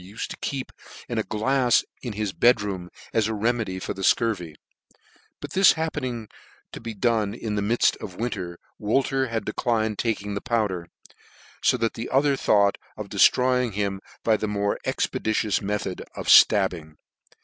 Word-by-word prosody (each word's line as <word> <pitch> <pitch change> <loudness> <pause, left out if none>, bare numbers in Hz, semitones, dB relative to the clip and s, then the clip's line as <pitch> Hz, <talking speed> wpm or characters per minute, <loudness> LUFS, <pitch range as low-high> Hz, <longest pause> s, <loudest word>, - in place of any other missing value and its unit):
u 100 +4 -14
fed - - -3
to - - -7
keep 135 -2 -4 0.4
in 120 -2 -2
a - - 0
glafs 125 +3 +2 0.2
in 120 -4 -5
his 105 -2 -3
bed 120 0 +4
room, 95 -3 -4 0.2
as 110 -2 +2
a 110 - -2
remedy 110 -3 -1
for 95 - -4
the 95 - -8
fcurvy: 95 -6 +1 0.8
but - - -8
this 190 -1 +6
happening 130 -8 -3 0.4
to - - -9
be 115 -1 -6
done 110 -1 +1
in 110 -2 -4
the 105 - 0
midft 115 +4 +2
of 90 - -7
winter, 90 -6 -4 0.2
Wolter 135 +4 +1
had 115 -1 -3
declined 110 -1 -1
taking 105 -3 -1
the 100 - -3
powder; 105 -8 -1 0.8
fo - - +4
that 115 - 0
the 115 +1 -6
other 140 +1 +3
thought 100 -6 +2 0.2
of - - -6
deftroying 125 -2 +3
him 100 -1 -2 0.2
by 110 -1 +3
the 110 - -2
more 100 0 -1
expeditions 110 -1 0
method 100 -2 -3
of - - -6
{tabbing. 90 -6 +5
110 Hz, 170 wpm, -25 LUFS, 100-120 Hz, 0.8 s, this